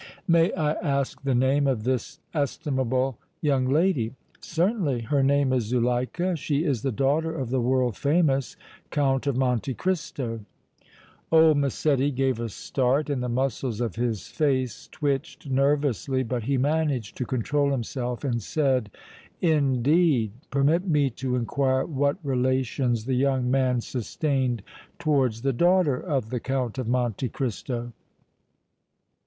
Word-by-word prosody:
"May 170 Hz, 0 st, +4 dB
I 155 Hz, -4 st, +1 dB
ask 140 Hz, -3 st, -2 dB
the 135 Hz, -2 st, 0 dB
name 135 Hz, +3 st, +3 dB
of 125 Hz, -6 st, 0 dB
this 125 Hz, 0 st, -2 dB
estimable 130 Hz, -4 st, -1 dB, 0.2 s
young 135 Hz, -5 st, +1 dB
lady?" 140 Hz, -5 st, +1 dB, 0.2 s
"Certainly. 170 Hz, -, 0 dB
Her 140 Hz, +5 st, +1 dB
name 140 Hz, -1 st, +3 dB
is 125 Hz, -4 st, +1 dB
Zuleika; 125 Hz, -, 0 dB
she 150 Hz, -1 st, -1 dB
is 135 Hz, -8 st, 0 dB
the 135 Hz, -, -1 dB
daughter 150 Hz, +7 st, 0 dB
of 130 Hz, -6 st, -4 dB
the 130 Hz, -1 st, +1 dB
world 125 Hz, -1 st, +1 dB
famous 140 Hz, -3 st, +1 dB, 0.3 s
Count 135 Hz, -2 st, +1 dB
of 135 Hz, -3 st, +1 dB
Monte 125 Hz, 0 st, 0 dB
Cristo." 150 Hz, -10 st, -2 dB, 0.9 s
Old 160 Hz, -2 st, +6 dB
Massetti 140 Hz, 0 st, +1 dB
gave 135 Hz, -3 st, 0 dB
a 115 Hz, -1 st, -3 dB
start 135 Hz, +6 st, 0 dB
and 135 Hz, -3 st, -1 dB
the 125 Hz, -, -2 dB
muscles 125 Hz, -2 st, -1 dB
of 115 Hz, -6 st, -2 dB
his 115 Hz, -3 st, -2 dB
face 130 Hz, -7 st, -1 dB
twitched 140 Hz, -1 st, -3 dB
nervously, 135 Hz, -1 st, +1 dB
but 120 Hz, -2 st, -3 dB
he 140 Hz, +1 st, +1 dB
managed 140 Hz, -5 st, 0 dB
to -, -, -1 dB
control 140 Hz, +4 st, 0 dB
himself 125 Hz, -1 st, -3 dB
and 120 Hz, -4 st, -1 dB
said: 130 Hz, -3 st, 0 dB, 0.5 s
"Indeed! 145 Hz, -, +2 dB, 0.2 s
Permit 150 Hz, +7 st, +2 dB
me 145 Hz, -5 st, +2 dB
to 125 Hz, +2 st, -2 dB
inquire 130 Hz, +2 st, +1 dB
what 140 Hz, 0 st, 0 dB
relations 130 Hz, -3 st, 0 dB
the 130 Hz, -, -1 dB
young 130 Hz, -1 st, +1 dB
man 130 Hz, -2 st, +2 dB
sustained 130 Hz, -, -1 dB, 0.3 s
towards 135 Hz, -8 st, +1 dB
the 135 Hz, -1 st, +1 dB
daughter 175 Hz, -2 st, +3 dB
of 135 Hz, -10 st, -2 dB
the 125 Hz, -, -1 dB
Count 130 Hz, -1 st, -2 dB
of 125 Hz, -, -3 dB
Monte 125 Hz, 0 st, 0 dB
Cristo." 120 Hz, -1 st, -4 dB
135 Hz, 140 wpm, -26 LUFS, 125-145 Hz, 0.9 s, Old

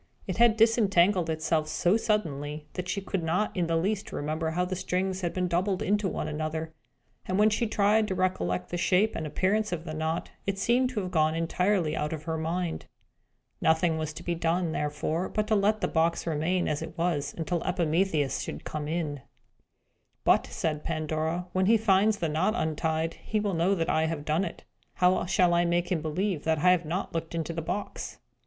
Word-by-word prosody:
It -, -, -3 dB
had 235 Hz, -1 st, +5 dB
disentangled 205 Hz, -6 st, +4 dB
itself 155 Hz, 0 st, 0 dB
so 175 Hz, +5 st, +2 dB
suddenly 150 Hz, -9 st, -1 dB
that 180 Hz, 0 st, -4 dB
she 200 Hz, +1 st, -1 dB
could 195 Hz, -1 st, -2 dB
not 175 Hz, +6 st, 0 dB
in 175 Hz, -3 st, 0 dB
the 165 Hz, -, +1 dB
least 195 Hz, +5 st, -1 dB
remember 155 Hz, +2 st, -2 dB
how 180 Hz, +3 st, 0 dB
the 185 Hz, +1 st, -3 dB
strings 185 Hz, +1 st, -1 dB
had 175 Hz, -2 st, -1 dB
been 180 Hz, -1 st, -1 dB
doubled 185 Hz, +2 st, 0 dB
into 205 Hz, 0 st, +1 dB
one -, -, -3 dB
another; 160 Hz, +1 st, -3 dB, 0.5 s
and 185 Hz, -, 0 dB
when 215 Hz, +1 st, +5 dB
she 230 Hz, +2 st, +1 dB
tried 210 Hz, +1 st, +3 dB
to 190 Hz, -, -2 dB
recollect 90 Hz, -, -1 dB
the 175 Hz, -, -3 dB
shape 190 Hz, +4 st, +2 dB
and 160 Hz, -, -3 dB
appearance 200 Hz, +7 st, 0 dB
of 170 Hz, -2 st, -3 dB
the 155 Hz, -, -5 dB
knot, 160 Hz, +2 st, -2 dB, 0.2 s
it 200 Hz, -1 st, 0 dB
seemed 245 Hz, +6 st, +2 dB
to 235 Hz, -5 st, -2 dB
have 185 Hz, -1 st, -5 dB
gone 155 Hz, -2 st, +2 dB
entirely 170 Hz, 0 st, +1 dB
out 150 Hz, +1 st, -2 dB
of 155 Hz, -1 st, -6 dB
her 160 Hz, 0 st, -2 dB
mind. 170 Hz, +1 st, -2 dB, 0.7 s
Nothing 160 Hz, 0 st, +2 dB
was 155 Hz, -1 st, -2 dB
to 170 Hz, -, -9 dB
be 175 Hz, -, -1 dB
done, 170 Hz, +1 st, 0 dB
therefore, 155 Hz, +4 st, -2 dB
but 215 Hz, -, -1 dB
to 215 Hz, -, +4 dB
let 210 Hz, +1 st, +2 dB
the -, -, +1 dB
box 165 Hz, +1 st, +1 dB
remain 170 Hz, +3 st, 0 dB
as 150 Hz, 0 st, -1 dB
it 160 Hz, +1 st, -7 dB
was 165 Hz, -4 st, -1 dB
until 170 Hz, +1 st, -1 dB
Epimetheus 165 Hz, -4 st, +1 dB
should -, -, -6 dB
come 150 Hz, -1 st, -4 dB
in. 155 Hz, -4 st, -2 dB, 1.0 s
"But," -, -, +4 dB
said 155 Hz, -2 st, -2 dB
Pandora, 160 Hz, +2 st, -2 dB
"when 185 Hz, 0 st, +2 dB
he 225 Hz, +2 st, +6 dB
finds 210 Hz, 0 st, +3 dB
the 170 Hz, -, -1 dB
knot 165 Hz, +8 st, +1 dB
untied, 160 Hz, -2 st, -1 dB
he 215 Hz, -, -1 dB
will 205 Hz, -2 st, -1 dB
know 175 Hz, +4 st, +2 dB
that 165 Hz, -3 st, -1 dB
I 160 Hz, 0 st, +2 dB
have 155 Hz, -2 st, -4 dB
done 160 Hz, +5 st, +1 dB
it. -, -, -7 dB, 0.3 s
How 180 Hz, 0 st, +3 dB
shall 180 Hz, -2 st, +3 dB
I 170 Hz, 0 st, +4 dB
make 175 Hz, +1 st, 0 dB
him 170 Hz, -4 st, +1 dB
believe 165 Hz, +2 st, -1 dB
that 160 Hz, 0 st, +1 dB
I 180 Hz, +5 st, +5 dB
have 180 Hz, -2 st, +2 dB
not 175 Hz, +5 st, -3 dB
looked 165 Hz, 0 st, -3 dB
into 165 Hz, 0 st, -2 dB
the 165 Hz, -, -3 dB
box?" 180 Hz, +5 st, -4 dB
170 Hz, 205 wpm, -28 LUFS, 160-190 Hz, 1.0 s, he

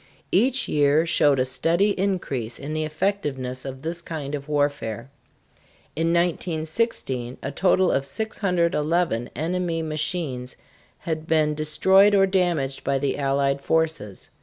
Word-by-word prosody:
Each 250 Hz, +7 st, +2 dB
year 150 Hz, +2 st, +3 dB
showed 145 Hz, -4 st, +3 dB
a 130 Hz, -, +2 dB
steady 170 Hz, +10 st, +2 dB
increase 175 Hz, -, -2 dB
in 145 Hz, +2 st, -6 dB
the 155 Hz, 0 st, -1 dB
effectiveness 150 Hz, -7 st, -2 dB
of 135 Hz, -1 st, -7 dB
this 170 Hz, +2 st, -4 dB
kind 150 Hz, -4 st, -6 dB
of 145 Hz, 0 st, -5 dB
warfare. 145 Hz, -5 st, -1 dB, 0.8 s
In 165 Hz, +1 st, 0 dB
1916 165 Hz, -, -1 dB
a 140 Hz, -, -3 dB
total 185 Hz, +3 st, +2 dB
of 135 Hz, 0 st, 0 dB
611 170 Hz, -, 0 dB
enemy 165 Hz, 0 st, -1 dB
machines 155 Hz, -5 st, -2 dB, 0.4 s
had 160 Hz, -1 st, -4 dB
been 155 Hz, -2 st, +2 dB
destroyed 190 Hz, +7 st, +4 dB
or 195 Hz, -1 st, +5 dB
damaged 175 Hz, -8 st, 0 dB
by 135 Hz, -, +1 dB
the 135 Hz, 0 st, -1 dB
Allied 140 Hz, 0 st, +1 dB
forces. 160 Hz, -12 st, -1 dB
155 Hz, 130 wpm, -24 LUFS, 140-175 Hz, 0.8 s, or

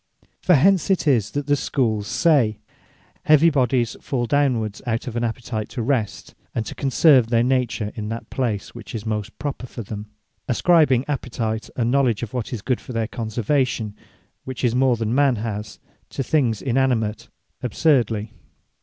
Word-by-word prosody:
From 180 Hz, -, +5 dB
hence 185 Hz, +6 st, +4 dB
it 190 Hz, -4 st, +1 dB
is, 115 Hz, -7 st, +3 dB
that 145 Hz, 0 st, -3 dB
the 145 Hz, -, +2 dB
Schooles 115 Hz, -7 st, 0 dB
say, 120 Hz, -5 st, +3 dB, 0.7 s
Heavy 155 Hz, +2 st, +6 dB
bodies 125 Hz, -4 st, +1 dB
fall 125 Hz, -3 st, -1 dB
downwards, 120 Hz, -6 st, 0 dB
out 115 Hz, -1 st, -1 dB
of 120 Hz, -, -6 dB
an 120 Hz, -, -1 dB
appetite 115 Hz, -1 st, -3 dB
to 120 Hz, -, -4 dB
rest, 115 Hz, -4 st, -2 dB, 0.2 s
and 115 Hz, -, -1 dB
to -, -, -6 dB
conserve 135 Hz, -2 st, +4 dB
their 115 Hz, 0 st, +2 dB
nature 120 Hz, -5 st, 0 dB
in 105 Hz, -1 st, -5 dB
that 115 Hz, 0 st, -6 dB
place 115 Hz, -6 st, -2 dB
which 120 Hz, -1 st, -9 dB
is 110 Hz, -1 st, -5 dB
most 110 Hz, -1 st, -3 dB
proper 140 Hz, -3 st, -4 dB
for 115 Hz, -, -7 dB
them; 105 Hz, +1 st, -7 dB, 0.4 s
ascribing 140 Hz, -2 st, +3 dB
appetite, 115 Hz, -5 st, -3 dB
and 120 Hz, -1 st, 0 dB
Knowledge 125 Hz, -5 st, +2 dB
of 110 Hz, -, -6 dB
what 125 Hz, -3 st, -3 dB
is 115 Hz, -5 st, -5 dB
good 125 Hz, -1 st, -1 dB
for 125 Hz, -, -9 dB
their 115 Hz, -1 st, -1 dB
conservation, 115 Hz, -1 st, -1 dB, 0.5 s
(which 130 Hz, -1 st, -6 dB
is 120 Hz, -2 st, +2 dB
more 130 Hz, 0 st, +3 dB
than 115 Hz, 0 st, -2 dB
man 140 Hz, -1 st, +3 dB
has) 105 Hz, -1 st, -5 dB, 0.3 s
to 135 Hz, -, -3 dB
things 125 Hz, -7 st, +1 dB
inanimate 120 Hz, -4 st, 0 dB, 0.3 s
absurdly. 120 Hz, -5 st, +1 dB
120 Hz, 170 wpm, -22 LUFS, 110-135 Hz, 0.7 s, Heavy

